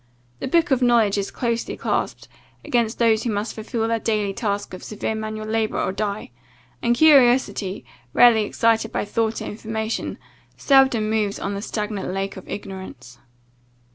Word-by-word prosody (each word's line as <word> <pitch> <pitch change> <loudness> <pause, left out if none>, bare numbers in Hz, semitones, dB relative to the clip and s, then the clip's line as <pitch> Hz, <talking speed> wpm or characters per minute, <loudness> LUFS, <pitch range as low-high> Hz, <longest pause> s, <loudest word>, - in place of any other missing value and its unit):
The - - -3
book 335 +3 +2
of 260 -1 +3
knowledge 230 -5 +3
is 200 - -3
closely 235 -2 -2
clasped, - - -2 0.4
against 235 -2 0
those 225 -2 +3
who 240 - -2
must 210 +1 -2
fulfil 225 +1 -3
their 230 0 0
daily 210 -3 0
task 205 -2 -3
of 185 - -8
severe 215 +1 -3
manual 215 0 -5
labour 220 0 -1
or - - 0
die; 205 -4 -4 0.5
and 235 0 +2
curiosity, 240 - +4 0.3
rarely 230 - +6
excited 225 +1 +1
by - - -2
thought 225 +2 -1
or - - -6
information, 220 +1 -4 0.4
seldom 265 -6 +4
moves 215 -2 0
on 200 - -3
the 200 - -4
stagnate 210 -2 -3
lake 195 +1 -3
of 190 - -11
ignorance." 190 -12 -8
220 Hz, 160 wpm, -22 LUFS, 205-230 Hz, 0.5 s, rarely